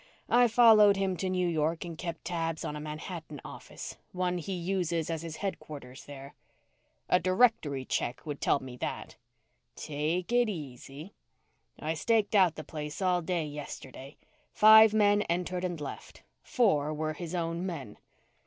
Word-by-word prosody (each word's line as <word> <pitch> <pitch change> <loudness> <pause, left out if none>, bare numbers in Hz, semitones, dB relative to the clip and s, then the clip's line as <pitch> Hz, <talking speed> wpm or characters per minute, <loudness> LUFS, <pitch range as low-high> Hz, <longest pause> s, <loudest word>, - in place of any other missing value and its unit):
"I 245 0 +5
followed 215 -3 +6
him 190 -1 0
to 185 +2 -2
New 180 -1 0
York 160 +1 -1
and 170 -1 -6
kept 170 0 -6
tabs 165 -2 -2
on 150 - -4
a - - -5
Manhattan 155 0 -7
office, - - -9 0.2
one 180 -1 -1
he 190 +4 -5
uses 175 -3 -1
as 160 -1 -3
his 165 -2 -6
headquarters 145 -9 -7
there." 140 -1 -10 0.7
"A 180 - +4
directory 185 - +2
check 120 +3 -3
would 145 -2 -5
tell - - +2
me 125 -1 -9
that." - - -5 0.6
"Take 155 +6 -2
it 240 -1 +3
easy. 145 - -8 0.7
I 155 +1 -2
staked 215 +5 +1
out 185 -6 +4
the 155 - -7
place 150 -1 -6
all 180 -2 +2
day 170 -1 -1
yesterday. 145 -1 -9 0.3
Five 220 0 +8
men 205 -1 +4
entered 180 +1 -1
and 175 -3 -3
left. 145 - -8 0.2
Four 155 - +1
were 155 0 -2
his 170 +1 -6
own 170 0 -2
men." 155 - -6
170 Hz, 155 wpm, -30 LUFS, 150-190 Hz, 0.7 s, Five